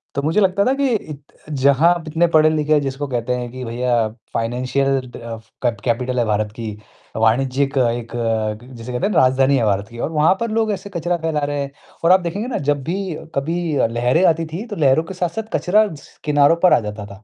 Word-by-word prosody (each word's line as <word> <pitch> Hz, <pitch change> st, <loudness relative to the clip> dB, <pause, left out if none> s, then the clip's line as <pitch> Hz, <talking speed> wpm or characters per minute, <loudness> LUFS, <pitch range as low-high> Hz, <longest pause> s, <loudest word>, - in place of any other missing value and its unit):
तो 140 Hz, -, 0 dB
मुझे 160 Hz, +8 st, +1 dB
लगता 195 Hz, +1 st, +3 dB
था 260 Hz, -, +3 dB
कि 280 Hz, 0 st, +1 dB
इत 150 Hz, -8 st, -6 dB, 0.3 s
जहाँ 140 Hz, +3 st, +4 dB
आप 170 Hz, -, -6 dB
इतने 165 Hz, +3 st, +2 dB
पढ़े-लिखे 155 Hz, -1 st, +4 dB
हैं 150 Hz, -, +5 dB
जिसको 135 Hz, +1 st, -3 dB
कहते 125 Hz, -1 st, -2 dB
हैं 125 Hz, -1 st, -4 dB
कि 130 Hz, 0 st, -7 dB
भैया 120 Hz, -1 st, 0 dB, 0.3 s
फ़ाइनेंशियल 130 Hz, +4 st, 0 dB, 0.2 s
दफ़ 115 Hz, -1 st, -8 dB
कैप 120 Hz, -4 st, 0 dB
कैपिटल 125 Hz, +1 st, 0 dB
है 120 Hz, -, +2 dB
भारत 105 Hz, -1 st, 0 dB
की, 115 Hz, -2 st, -5 dB, 0.4 s
वाणिज्यिक 130 Hz, +5 st, +1 dB
एक 120 Hz, -2 st, +1 dB
क 115 Hz, +1 st, -2 dB
जिसे 115 Hz, +2 st, -7 dB
कहते 125 Hz, +10 st, 0 dB
हैं 210 Hz, -, -2 dB
राजधानी 130 Hz, +2 st, +4 dB
है 120 Hz, -, +1 dB
भारत 100 Hz, 0 st, 0 dB
की 120 Hz, 0 st, -11 dB
और 155 Hz, -, -2 dB
वहाँ 155 Hz, +2 st, +4 dB
पर 230 Hz, -1 st, -2 dB
लोग 220 Hz, -1 st, +1 dB
ऐसे 200 Hz, 0 st, -5 dB
कचरा 175 Hz, +1 st, 0 dB
फैला 160 Hz, -2 st, -1 dB
रहे 145 Hz, 0 st, -2 dB
हैं 140 Hz, 0 st, -4 dB, 0.3 s
और 170 Hz, -, +5 dB
आप 185 Hz, -, +7 dB
देखेंगे 185 Hz, +6 st, -3 dB
ना 255 Hz, -, -2 dB
जब 145 Hz, -2 st, +1 dB
भी 180 Hz, +1 st, -3 dB, 0.2 s
कभी 165 Hz, +3 st, -1 dB
अ, 125 Hz, -, +3 dB
लहरें 120 Hz, +9 st, +1 dB
आती 165 Hz, -1 st, +2 dB
थी 170 Hz, +8 st, -6 dB
तो 205 Hz, -, -6 dB
लहरों 145 Hz, -2 st, +3 dB
के 165 Hz, -, -8 dB
साथ-साथ 180 Hz, +4 st, -2 dB
कचरा 210 Hz, +4 st, +3 dB
स 140 Hz, -, -17 dB
किनारों 145 Hz, +1 st, +4 dB
पर 180 Hz, -, +6 dB
आ -, -, +5 dB
जाता 105 Hz, -1 st, -6 dB
था 100 Hz, +1 st, -13 dB
140 Hz, 225 wpm, -20 LUFS, 120-165 Hz, 0.4 s, आप